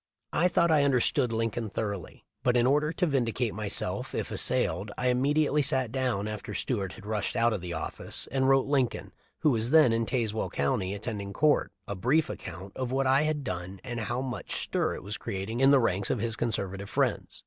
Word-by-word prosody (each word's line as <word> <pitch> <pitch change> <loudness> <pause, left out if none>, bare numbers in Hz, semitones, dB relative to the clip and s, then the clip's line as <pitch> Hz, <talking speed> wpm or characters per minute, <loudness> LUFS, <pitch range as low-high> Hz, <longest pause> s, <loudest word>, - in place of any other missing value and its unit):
I 175 - +3
thought 170 -2 +2
I 150 -2 +5
understood 130 -1 +2
Lincoln 115 0 -2
thoroughly, 100 -4 -5 0.2
but 125 0 +2
in 120 - +3
order 150 +4 +2
to 180 - 0
vindicate 125 -5 0
myself 105 -1 -2
if - - -3
assailed 95 +6 +1
I 125 - +1
imme 135 +4 +1
diately 150 -1 +3
sat 130 -4 +2
down, 125 -6 -1
after 105 0 -6
Stuart 100 -7 -2
had 110 - -12
rushed 105 0 -2
out 115 0 +3
of 100 - -3
the 85 -1 -5
office, 80 - -2
and 130 0 +2
wrote 135 -1 +4
Lincoln, 135 -4 0 0.3
who 150 - +4
was 115 -1 +1
then 150 -5 +6
in 115 0 0
Tazewell 110 -4 -1
County 100 -7 -1
attending 100 -2 -5
court, 150 +5 +2 0.2
a - - -3
brief 130 +11 +1
account 90 +3 -9
of 130 -1 -3
what 135 +1 +1
I 135 +2 +4
had 155 -1 -1
done 95 -3 -5
and 120 -1 -4
how 115 +4 -2
much 130 -2 -4
stir - - -1
it - - -9
was 105 +4 -5
creating 100 +4 -4
in 135 +1 +6
the 140 - +7
ranks 100 -6 +1
of - - +1
his 115 +1 -1
conservative 100 -4 -3
friends. - - -1
120 Hz, 205 wpm, -28 LUFS, 105-135 Hz, 0.3 s, the